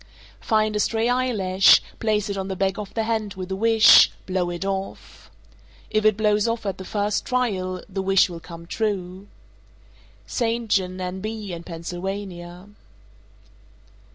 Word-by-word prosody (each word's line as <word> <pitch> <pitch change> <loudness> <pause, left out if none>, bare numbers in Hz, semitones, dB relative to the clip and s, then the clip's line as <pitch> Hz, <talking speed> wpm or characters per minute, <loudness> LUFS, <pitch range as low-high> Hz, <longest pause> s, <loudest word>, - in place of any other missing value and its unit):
_ - - -19 0.4
438. - - -18
Find 215 -1 +2
a - - 0
stray 225 +2 +1
eyelash; 210 -7 +4 0.2
place 215 -2 0
it 200 - -3
on 190 -1 -4
the 190 - -4
back 195 +1 -1
of 205 -2 -6
the 225 - 0
hand 220 -3 -2
with 185 0 -7
a - - -1
wish; 225 +2 +7 0.2
blow 185 -2 -1
it 175 +2 -4
off. 195 0 -6 0.6
If 215 0 +1
it 215 -2 +4
blows 210 0 +2
off 230 -1 -2
at 195 -1 -3
the 190 - -7
first 205 +1 -1
trial, 190 -8 -2
the 195 -1 -4
wish 195 0 +4
will 170 -2 -8
come 170 0 -11
true. 190 -1 -3 1.0
_St. 230 -1 -2
John, 185 -2 0
N.B., 190 +2 -5
and 170 0 -7
Pennsylvania. 175 +2 -7
195 Hz, 160 wpm, -23 LUFS, 185-215 Hz, 1.0 s, wish